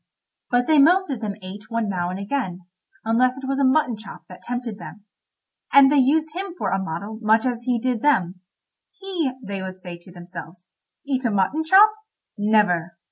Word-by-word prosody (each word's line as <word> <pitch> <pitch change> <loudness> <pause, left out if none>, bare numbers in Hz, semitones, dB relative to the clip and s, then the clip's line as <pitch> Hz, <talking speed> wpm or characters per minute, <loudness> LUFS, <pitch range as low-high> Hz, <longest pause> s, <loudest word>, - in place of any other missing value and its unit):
But 245 0 +2
they 310 +1 +4
most 355 +4 +4
of 250 -4 -4
them 210 -2 -3
ate 205 +4 -9
one 230 -2 -1
now 180 -3 -2
and 185 - -4
again, 200 -3 -3 0.4
unless 250 +3 +2
it 270 -1 -7
was 275 0 -1
a - - +2
mutton 260 -2 +2
chop 215 -2 -12
that 180 - -12
tempted 245 -3 -5
them. 210 -3 -11 0.7
And 280 -1 +7
they 295 - +4
used 300 +4 +2
him 375 -1 -5
for - - -2
a 195 - +1
model 195 +5 -5
much 220 +1 +3
as 245 -2 -1
he 250 -2 +1
did 240 -1 -1
them. 185 -11 +1 0.6
"He," 365 -8 -2
they 200 -2 -5
would 190 0 -6
say 175 -2 -9
to 175 +2 -16
themselves, 175 0 -11 0.4
"eat 270 -2 -1
a 240 - +1
mutton 210 +10 0
chop? 390 +6 +7 0.4
Never." 180 -5 +1
225 Hz, 190 wpm, -22 LUFS, 190-275 Hz, 0.7 s, And